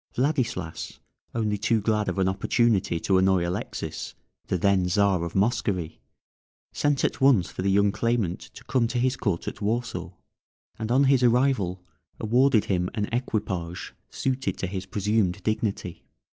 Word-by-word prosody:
Vladislas, 125 - -1 0.4
only 105 -3 0
too 110 +2 +2
glad 105 0 0
of - - -3
an 95 -1 +2
opportunity 95 -2 +1
to 95 -1 +3
annoy 95 -2 +3
Alexis, 90 - -5 0.3
the 95 - 0
then 95 0 +2
Czar 95 -1 +2
of 85 - -5
Moscovy, 100 -6 0 0.7
sent 145 -2 +1
at - - -2
once 130 -10 +4
for - - -5
the 100 - +1
young 100 +1 +4
claimant 115 -6 0
to - - -13
come 120 -3 +1
to 120 - -3
his 130 +1 +1
court 100 -8 -2
at - - -5
Warsaw, 115 +3 -2 0.7
and 110 +1 -3
on 135 +3 +4
his 135 -2 +4
arrival 120 -7 +2 0.4
awarded 120 +1 +3
him 90 -2 0
an 105 -2 -1
equipage 100 -8 -3 0.2
suited 130 0 -2
to - - -2
his 95 0 -5
presumed 105 -3 0
dignity. 105 -5 -2
105 Hz, 155 wpm, -26 LUFS, 95-120 Hz, 0.7 s, once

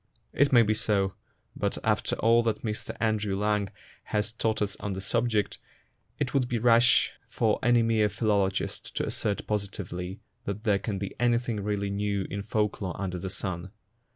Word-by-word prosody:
It 145 0 +3
may 120 -3 +7
be 110 0 +2
so, 100 -3 +1 0.4
but, - - -1
after - - +1
all 115 +1 +4
that 115 -2 -1
Mr 105 -2 -4
Andrew 105 -3 0
Lang 105 -1 +1 0.4
has 105 +1 -1
taught 110 -1 0
us 100 -1 -1
on 100 - -3
the 95 - -4
subject, 110 0 0 0.6
it 145 -4 -2
would 135 -3 +2
be 120 - 0
rash 120 +1 +5 0.2
for 110 -2 +1
any 120 0 +4
mere 110 -2 +3
philologist 100 -3 0
to - - 0
assert 100 -1 -2
positively 95 -2 -3 0.3
that 100 +2 -4
there 100 -3 +3
can 100 0 -3
be 100 0 -4
anything 120 -2 +1
really 100 0 -1
new 100 -1 -1
in 100 - -2
folk 105 0 -1
lore 90 -3 -3
under 90 -2 -3
the 95 - -4
sun. 95 -1 -4
105 Hz, 175 wpm, -28 LUFS, 100-115 Hz, 0.6 s, may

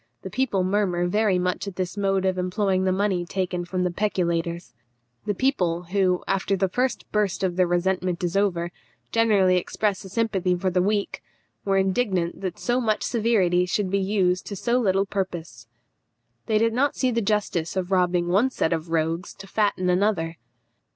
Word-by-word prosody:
The 190 - -6
people 215 -5 0
murmur 185 -2 +1
very 205 +1 +2
much 180 +2 -1
at 195 - -6
this 185 0 -3
mode 195 -2 0
of 185 -1 0
employing 185 +1 0
the 185 - +2
money 190 -2 0
taken 180 -1 -3
from 180 +1 -2
the 180 - 0
peculators." 170 -3 -1 0.5
The 205 - 0
people, 180 -10 0
who, 185 -2 +2
after 195 0 +1
the 190 - +2
first 250 +7 -1
burst 200 -3 0
of 180 -2 0
their 185 -1 +3
resentment 180 0 0
is 175 0 -1
over, 175 -4 +1 0.4
generally 205 -5 +4
express 200 +2 -1
a 190 - -10
sympathy 195 -4 0
for 185 +1 -1
the 180 0 +2
weak, 205 +1 -1 0.4
were 195 -1 +2
indignant 190 -3 0
that 185 -3 -4
so 245 +1 0
much 215 -3 0
severity 200 -7 +2
should 190 0 -1
be 200 - +2
used 190 -2 +1
to 200 - -5
so 240 +5 +1
little 195 -4 +2
purpose. 170 - -5 0.8
They 220 - +2
did 225 +1 +2
not 280 +4 +1
see 255 -1 +1
the 230 0 0
justice 195 -6 -1
of 185 0 -2
robbing 180 -2 +2
one 200 +9 +3
set 165 -10 0
of 165 0 -3
rogues 165 +2 -1
to - - -11
fatten 200 -2 0
another. 180 -3 +1
190 Hz, 180 wpm, -24 LUFS, 180-205 Hz, 0.8 s, generally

